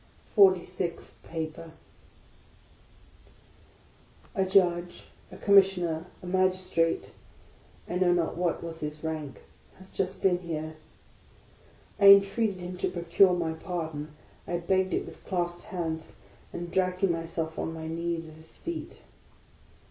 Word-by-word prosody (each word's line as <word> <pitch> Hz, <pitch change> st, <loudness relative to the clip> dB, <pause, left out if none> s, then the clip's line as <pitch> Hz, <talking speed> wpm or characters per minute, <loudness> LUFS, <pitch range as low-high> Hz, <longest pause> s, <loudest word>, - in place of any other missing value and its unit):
FORTY 190 Hz, -4 st, +6 dB
SIXTH 180 Hz, -2 st, -5 dB
PAPER 160 Hz, 0 st, -6 dB, 2.6 s
A 195 Hz, -, +1 dB
JUDGE, 175 Hz, -2 st, +2 dB, 0.3 s
a 185 Hz, -, -10 dB
Commissioner, 185 Hz, -5 st, +3 dB, 0.2 s
a -, -, -7 dB
Magistrate, 185 Hz, -2 st, +1 dB, 0.4 s
— -, -, -28 dB
I 180 Hz, -, -2 dB
know 180 Hz, -1 st, +3 dB
not 175 Hz, -2 st, +1 dB
what 170 Hz, -1 st, -1 dB
was 165 Hz, -1 st, -6 dB
his 150 Hz, +1 st, -5 dB
rank, 155 Hz, -4 st, -4 dB, 0.2 s
— -, -, -27 dB
has 190 Hz, 0 st, -15 dB
just 190 Hz, 0 st, -3 dB
been 180 Hz, -2 st, +4 dB
here. 160 Hz, -2 st, -5 dB, 1.2 s
I 200 Hz, -, +4 dB
mtreated 200 Hz, +2 st, +7 dB
him 180 Hz, 0 st, -7 dB
to -, -, 0 dB
procure 175 Hz, +2 st, +4 dB
my 170 Hz, -2 st, -1 dB
pardon; 160 Hz, -3 st, -5 dB, 0.3 s
I 175 Hz, -, -1 dB
begged 185 Hz, +2 st, +1 dB
it -, -, -1 dB
with -, -, -12 dB
clasped 175 Hz, -2 st, -2 dB
hands, 160 Hz, -3 st, -4 dB, 0.4 s
and 175 Hz, 0 st, -6 dB
dragging 185 Hz, 0 st, +1 dB
myself 165 Hz, -1 st, -3 dB
on -, -, -2 dB
my 160 Hz, -1 st, -6 dB
knees 165 Hz, 0 st, -3 dB
at 155 Hz, -, -11 dB
his 160 Hz, +1 st, -16 dB
feet. 340 Hz, -1 st, -6 dB
175 Hz, 135 wpm, -28 LUFS, 165-185 Hz, 2.6 s, mtreated